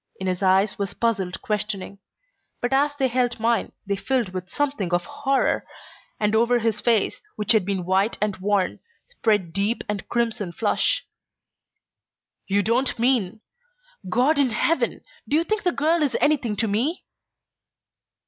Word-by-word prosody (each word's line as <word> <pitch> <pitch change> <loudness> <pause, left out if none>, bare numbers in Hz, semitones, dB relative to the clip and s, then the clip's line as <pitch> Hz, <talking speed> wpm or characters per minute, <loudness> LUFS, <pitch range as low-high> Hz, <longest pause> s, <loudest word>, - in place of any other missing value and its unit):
In 190 - -4
his 185 0 -1
eyes 190 +2 +3
was 200 -2 -3
puzzled 200 -6 -1
questioning, 205 -2 -3 0.6
but 245 +2 -1
as 285 +2 +2
they 270 -2 +1
held 245 -1 0
mine 230 0 +1
they 200 0 0
filled 240 +1 0
with 185 0 -6
something 275 -11 -1
of 175 0 +1
horror, 275 -1 0 0.6
and 210 0 +1
over 235 +2 +3
his 225 -2 -1
face, 230 -4 +1
which 210 +1 +1
had 215 -5 +3
been 190 -3 -1
white 190 +4 +1
and 210 -2 0
worn, 195 0 0 0.3
spread 210 - 0
deep 205 +4 0
and 210 -2 -4
crimson 230 -6 -1
flush. 210 +2 +1 1.4
"You 200 +1 +2
don't 240 +5 +1
mean 230 -4 +1 0.7
God 260 - +3
in 275 -3 +3
heaven! 325 +9 0 0.3
Do 295 - +2
you 325 - +3
think 430 +4 -1
the 355 - +1
girl 325 +2 +1
is 280 -5 +1
anything 275 -8 +2
to 225 - 0
me?" 245 - 0
220 Hz, 155 wpm, -24 LUFS, 200-260 Hz, 1.4 s, eyes